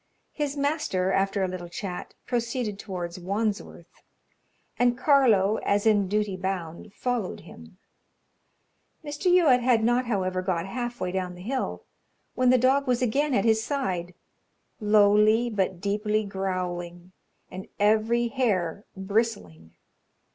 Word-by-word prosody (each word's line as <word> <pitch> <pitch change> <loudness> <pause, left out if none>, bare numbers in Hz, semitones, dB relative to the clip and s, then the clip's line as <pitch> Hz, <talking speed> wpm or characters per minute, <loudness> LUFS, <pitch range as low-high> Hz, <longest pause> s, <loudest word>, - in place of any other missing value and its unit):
His 295 -1 -3
master, 280 - 0
after 195 +1 +1
a - - +1
little 180 -1 -6
chat, 180 0 -6
proceeded 235 -3 -2
towards 180 -4 -5
Wandsworth, 205 +3 -4 0.8
and 245 0 +3
Carlo, 235 -7 +4
as 205 +1 0
in 205 -3 +3
duty 210 0 -1
bound, 185 0 -5
followed 245 -6 -2
him. - - -14 1.3
Mr. 295 +5 0
Youatt 310 -9 +5
had 240 -2 +3
not, 240 +2 +2
however, 185 -4 -1
got 180 -2 -1
half 240 +4 -5
way 180 - -2
down 180 -1 -3
the 180 - -11
hill 260 +5 -3 0.5
when 255 -1 +2
the 255 - +6
dog 265 +3 +2
was 250 0 +1
again 275 +4 +1
at 200 - +1
his 220 -1 +3
side, 185 - -3 0.6
lowly 215 +2 +4
but 190 -4 -1
deeply 210 +2 0
growling, 180 -2 -4 0.4
and 185 +1 -8
every 220 +3 +2
hair 205 -8 -1
bristling. 190 - -2
210 Hz, 130 wpm, -26 LUFS, 185-245 Hz, 1.3 s, the